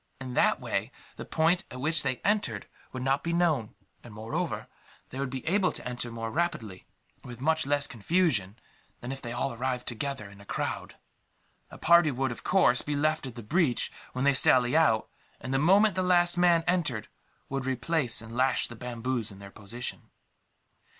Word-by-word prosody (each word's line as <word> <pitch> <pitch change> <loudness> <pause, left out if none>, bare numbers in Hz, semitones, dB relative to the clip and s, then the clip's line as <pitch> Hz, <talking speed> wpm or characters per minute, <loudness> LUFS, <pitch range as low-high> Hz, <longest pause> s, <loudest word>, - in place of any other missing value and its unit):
In 130 -1 -6
that - - +3
way - - -2 0.2
the - - -8
point 170 +3 +2
at 125 - -8
which 155 +4 +2
they 130 -2 0
entered 200 - 0 0.3
would 130 -1 -5
not 135 +2 +1
be 170 - -1
known 160 -10 +1 0.3
and, 115 -3 -12
moreover, 155 +11 -3 0.5
they 130 - -6
would 140 -1 -2
be 130 -1 -6
able 190 +2 +2
to - - -4
enter 125 -1 -3
more 115 -1 -5
rapidly, 115 - -3 0.3
and - - -21
with 120 0 -9
much 160 +1 +1
less 145 0 +1
confusion, 120 - 0 0.4
than 120 - -6
if 135 0 -6
they 120 - -6
all 120 +2 -2
arrived 125 +1 -3
together 130 -1 -4
in 100 0 -14
a - - -13
crowd. - - -4 0.7
A - - -11
party 170 -1 +5
would, 135 -1 -1
of 120 - -8
course, 150 -10 +4
be 150 - -3
left 155 0 0
at 125 - -9
the 120 - -8
breach 150 - +1 0.2
when 130 - -2
they 140 - +5
sally 125 0 +5
out 135 -9 +3 0.3
and, 130 - -5
the 135 - +2
moment 195 +7 +5
the 185 - -1
last 175 -1 +3
man 175 -2 +4
entered, 150 -12 0 0.4
would 135 -1 -3
replace 130 -2 +1
and 115 +1 -10
lash 130 +1 +2
the 120 - -10
bamboos 120 0 -3
in 100 - -10
their 100 0 -11
position. 110 +4 -5
130 Hz, 190 wpm, -28 LUFS, 120-160 Hz, 0.7 s, party